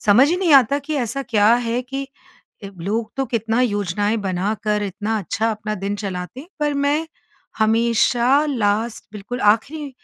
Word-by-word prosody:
समझ 240 Hz, +8 st, +6 dB
ही 350 Hz, -, +1 dB
नहीं 365 Hz, -4 st, +2 dB
आता 275 Hz, +1 st, +5 dB
कि 295 Hz, +2 st, -5 dB
ऐसा 250 Hz, +1 st, -2 dB
क्या 220 Hz, -3 st, +3 dB
है 240 Hz, 0 st, -1 dB
कि 270 Hz, +2 st, -5 dB, 0.6 s
ए 200 Hz, -, -6 dB
लोग 220 Hz, +5 st, -2 dB
तो 270 Hz, -, 0 dB
कितना 225 Hz, 0 st, 0 dB
योजनाएँ 205 Hz, -1 st, 0 dB
बनाकर, 205 Hz, +2 st, -1 dB
इतना 205 Hz, +3 st, -2 dB
अच्छा 220 Hz, +4 st, -1 dB
अपना 215 Hz, 0 st, -4 dB
दिन 200 Hz, +1 st, -3 dB
चलाते 195 Hz, +2 st, -5 dB
हैं। 320 Hz, +7 st, -12 dB
पर 295 Hz, -1 st, 0 dB
मैं 285 Hz, +3 st, 0 dB, 0.5 s
हमेशा 235 Hz, +5 st, +3 dB
लास्ट 225 Hz, -4 st, -1 dB
बिल्कुल 210 Hz, +5 st, -6 dB
आखिरी 275 Hz, +8 st, +1 dB
225 Hz, 160 wpm, -21 LUFS, 205-270 Hz, 0.6 s, समझ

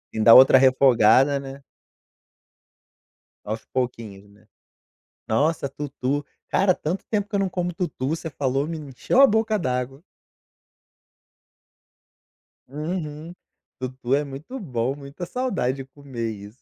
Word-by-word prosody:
Ainda 110 Hz, +1 st, +7 dB
outra 130 Hz, 0 st, +9 dB
refogada, 130 Hz, +1 st, +4 dB
né? 135 Hz, 0 st, -10 dB, 1.8 s
Aos -, -, -5 dB
pouquinhos, 115 Hz, -6 st, -5 dB
né. 105 Hz, +1 st, -23 dB, 0.8 s
Nossa, 140 Hz, +5 st, +1 dB
tutu, 140 Hz, 0 st, -3 dB, 0.2 s
cara, 190 Hz, -2 st, +3 dB
tanto 170 Hz, +6 st, -4 dB
tempo 205 Hz, -2 st, -1 dB
que 210 Hz, -, -10 dB
eu -, -, +1 dB
não 195 Hz, -, 0 dB
como 180 Hz, -1 st, -3 dB
tutu, 165 Hz, -7 st, -3 dB
você 160 Hz, +1 st, -3 dB
falou, 135 Hz, 0 st, -1 dB
me 165 Hz, 0 st, -5 dB
encheu 145 Hz, -, 0 dB
a 275 Hz, -, +9 dB
boca 220 Hz, -2 st, +1 dB
d'água. 130 Hz, -2 st, -3 dB, 2.7 s
Uhum. 155 Hz, +2 st, -5 dB, 0.5 s
Tutu 130 Hz, 0 st, -3 dB
é 145 Hz, -, 0 dB
muito 145 Hz, -, -8 dB
bom, 130 Hz, -, -2 dB
muita 140 Hz, +4 st, -8 dB
saudade 175 Hz, -, -2 dB
de 135 Hz, -, -7 dB
comer 130 Hz, -4 st, -6 dB
isso. 105 Hz, +3 st, -11 dB
140 Hz, 125 wpm, -23 LUFS, 125-165 Hz, 2.7 s, outra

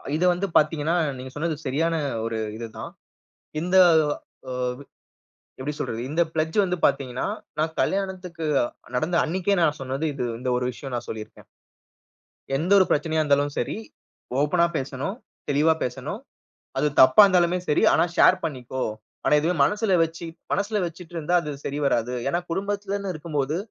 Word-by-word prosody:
இத 160 Hz, -, 0 dB
வந்து 185 Hz, +3 st, -2 dB
பார்த்தீங்கன்னா, 155 Hz, +1 st, +2 dB, 0.2 s
நீங்க 130 Hz, +1 st, -8 dB
சொன்னது 160 Hz, +2 st, -1 dB
சரியான 160 Hz, +5 st, 0 dB, 0.3 s
ஒரு 115 Hz, 0 st, -2 dB, 0.2 s
இது 115 Hz, 0 st, -5 dB
தான். -, -, -6 dB, 0.7 s
இந்த 180 Hz, +2 st, 0 dB, 0.7 s
ஆ -, -, -4 dB, 1.1 s
எப்பிடி 145 Hz, +3 st, -3 dB
சொல்றது? 115 Hz, -, -3 dB
இந்த 160 Hz, +3 st, 0 dB
பிளெட்ஜ் 160 Hz, +2 st, -1 dB
வந்து 180 Hz, -1 st, -1 dB
பார்த்தீங்கன்னா, 130 Hz, -3 st, -1 dB, 0.3 s
நான் 160 Hz, +1 st, -1 dB
கல்யாணத்துக்கு 185 Hz, -4 st, -2 dB, 0.5 s
நடந்த 160 Hz, +7 st, 0 dB
அன்னக்கே 185 Hz, +4 st, 0 dB
நான் 150 Hz, -2 st, +2 dB
சொன்னது, 135 Hz, +3 st, -3 dB
இது 130 Hz, -3 st, -3 dB, 0.2 s
இந்த 125 Hz, 0 st, -1 dB
ஒரு 125 Hz, -, -2 dB
விஷயம் 135 Hz, +2 st, -7 dB
நான் 120 Hz, -, -5 dB
சொல்லியிருக்கேன். 110 Hz, -1 st, -8 dB, 1.1 s
எந்த 165 Hz, +7 st, -2 dB
ஒரு 190 Hz, -, +6 dB
பிரச்சனையா 155 Hz, +1 st, +1 dB
இருந்தாலும் 145 Hz, -1 st, +2 dB
சரி, -, -, -1 dB, 0.7 s
ஓப்பனா 170 Hz, +4 st, +3 dB
பேசணும், 135 Hz, +8 st, -4 dB, 0.3 s
தெளிவா 150 Hz, +3 st, +4 dB
பேசணும். 130 Hz, -, -4 dB, 0.6 s
அது -, -, +2 dB, 0.2 s
தப்பா 170 Hz, +11 st, +8 dB
இருந்தாலுமே 180 Hz, -2 st, +3 dB
சரி, 150 Hz, -, +3 dB
ஆனா 165 Hz, -, +4 dB
ஷேர் -, -, +6 dB
பண்ணிக்கோ! 130 Hz, -4 st, -4 dB, 0.4 s
ஆனா -, -, +5 dB
இதுவே 165 Hz, +4 st, +1 dB
மனசில 210 Hz, +4 st, 0 dB
வச்சி, 165 Hz, +1 st, -7 dB, 0.3 s
மனசில 205 Hz, +1 st, 0 dB
வச்சிட்டு 170 Hz, 0 st, -10 dB
இருந்தா 165 Hz, +2 st, -1 dB
அது 150 Hz, -, -5 dB
சரி 140 Hz, -, -3 dB
வராது. 125 Hz, -2 st, +1 dB
ஏனா 170 Hz, -, +1 dB
குடும்பத்திலன்னு 200 Hz, +1 st, -2 dB
இருக்கும்போது, 150 Hz, -2 st, -2 dB
155 Hz, 145 wpm, -24 LUFS, 135-180 Hz, 1.1 s, தப்பா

